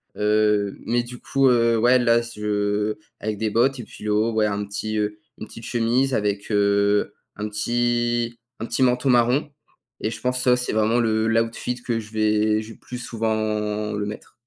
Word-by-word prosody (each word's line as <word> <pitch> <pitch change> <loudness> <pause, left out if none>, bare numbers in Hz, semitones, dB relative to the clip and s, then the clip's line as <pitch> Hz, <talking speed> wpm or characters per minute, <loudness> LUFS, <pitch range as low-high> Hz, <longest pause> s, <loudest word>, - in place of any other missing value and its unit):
Heu, 105 -1 +2
mais 120 +1 +1
du 125 0 -9
coup, 135 -1 +2
heu, 115 -1 +3
ouais 125 +3 +4
là, 120 -1 +3
c 115 -2 -10
je 105 0 0 0.2
avec 105 -1 -3
des 110 0 -1
bottes 130 +5 +2
et - - -8
puis 105 - -12
le 105 - +1
haut, 110 +2 +2
ouais 110 -1 +2
un 105 0 -1
petit, 110 +2 -4
heu, 105 0 -1 0.2
une 110 - -8
petite 115 - -11
chemise 125 +3 +1
avec, 100 -1 -1
heu, 100 0 +2 0.2
un 105 +1 -3
petit 120 +1 0 0.2
un - - -2
petit 130 +3 0
manteau 125 +2 +2
marron. 125 +4 +3 0.5
Et 110 - -1
je - - -7
pense 125 0 0
ça 125 -1 +4
c'est 125 0 -2
vraiment 110 +2 +2
le 110 -1 +1
l' 115 0 +3
outfit 115 +2 -3
que 115 -2 -1
je 105 -1 -10
vais 110 0 +2
je 110 +1 -10
vais - - -13
plus 125 - -8
souvent 110 -2 -2
le 105 0 -2
mettre. 105 +1 -8
110 Hz, 205 wpm, -23 LUFS, 105-120 Hz, 0.5 s, ouais